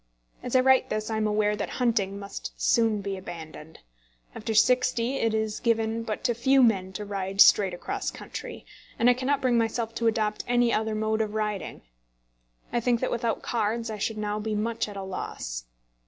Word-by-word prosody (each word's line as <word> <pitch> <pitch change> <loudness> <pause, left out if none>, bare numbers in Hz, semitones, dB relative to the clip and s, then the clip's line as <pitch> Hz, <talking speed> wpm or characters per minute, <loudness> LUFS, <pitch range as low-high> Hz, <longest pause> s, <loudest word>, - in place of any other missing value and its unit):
As 250 - -4
I 255 - +6
write 260 0 +4
this 215 +1 -2
I 220 - -1
am 215 0 +1
aware 210 0 +1
that - - -4
hunting 220 -6 +1
must 200 0 -8
soon 225 -3 +2
be 195 -1 -4
abandoned. 160 -3 -9 0.5
After 220 - -4
sixty 250 +2 +3
it 225 - +1
is 220 -1 -1
given 225 -1 0
but 220 -2 -4
to 240 - +2
few 265 +3 +4
men 190 -5 +2
to 210 +2 -5
ride 195 -1 -4
straight 195 -3 +6
across - - -3
country, - - -8 0.3
and 245 +2 +5
I - - +4
cannot 265 +3 0
bring 245 -2 +3
myself 225 0 -1
to 230 - 0
adopt 215 -1 0
any 240 -1 +3
other 220 0 0
mode 220 +1 0
of 215 -1 -3
riding. 210 -4 -3 0.9
I 240 - +2
think 235 0 +1
that 255 - -1
without 235 -1 -1
cards 230 0 -1
I 215 - -6
should 220 +2 -2
now 210 0 -2
be 215 0 -2
much 225 +2 -1
at 200 - -8
a 195 - -4
loss. - - -5
220 Hz, 195 wpm, -27 LUFS, 205-235 Hz, 0.9 s, I